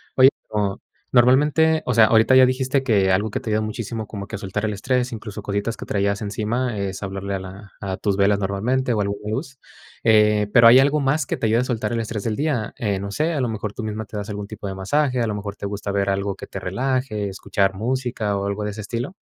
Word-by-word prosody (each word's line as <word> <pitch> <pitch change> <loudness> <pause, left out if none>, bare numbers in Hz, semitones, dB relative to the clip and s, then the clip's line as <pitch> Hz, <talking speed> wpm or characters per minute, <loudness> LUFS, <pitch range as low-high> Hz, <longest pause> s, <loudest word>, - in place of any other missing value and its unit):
Oye, 130 0 +8 0.2
o 100 -2 -1 0.3
normalmente, 150 +6 +4
o 125 - 0
sea, 115 -2 +7
ahorita 110 +3 +4
ya 130 0 +8
dijiste 130 +1 0
que 100 -7 +3
algo 105 +3 0
que - - -2
te - - -6
ayuda 105 0 +2
muchísimo 110 0 -4
como 100 -2 -7
que 110 - -6
a - - -6
soltar 100 +1 -3
el 105 - -1
estrés, 125 +5 -1
incluso 105 -1 -7
cositas 100 +3 -2
que - - -7
traías 100 +1 0
encima, 110 +3 -2
es 95 -1 -3
hablarle 100 0 -4
a - - -3
la 95 +2 -10
a 95 -2 -3
tus 100 -2 -1
velas 100 0 +3
normalmente, 120 +7 0
o 110 - 0
a - - +2
alguna 100 +1 -4
luz. 135 +3 -4 0.5
Eh, 105 -2 +4
pero, 115 -1 +8
¿hay 120 +3 +9
algo 140 +3 +3
más 140 +1 +1
que - - -3
te 110 - 0
ayude 110 +2 +3
a - - +1
soltar 115 -4 -2
el 115 - 0
estrés 110 -2 -4
del 110 -2 -1
día? 140 -6 -1
Eh, 100 -4 -1
no 100 +1 -5
sé, 155 +9 0
¿a 145 - -1
lo 125 - +1
mejor 110 -1 -4
tú 115 - -6
misma 110 0 -4
te 105 - -12
das 105 +1 -5
algún 105 -1 -5
tipo 105 -1 -7
de 95 - -4
masaje, 125 +7 0
a 115 - +1
lo 110 - -2
mejor 100 -1 -5
te - - -7
gusta 100 0 -4
ver 100 0 0
algo 100 0 -1
que - - -9
te 95 - -6
relaje, 115 +1 -2
escuchar 95 0 0
música 115 -1 -2
o 100 - -2
algo 100 +1 -2
de 105 - -2
ese 105 +1 -7
estilo? 120 - -4
110 Hz, 255 wpm, -22 LUFS, 100-125 Hz, 0.5 s, hay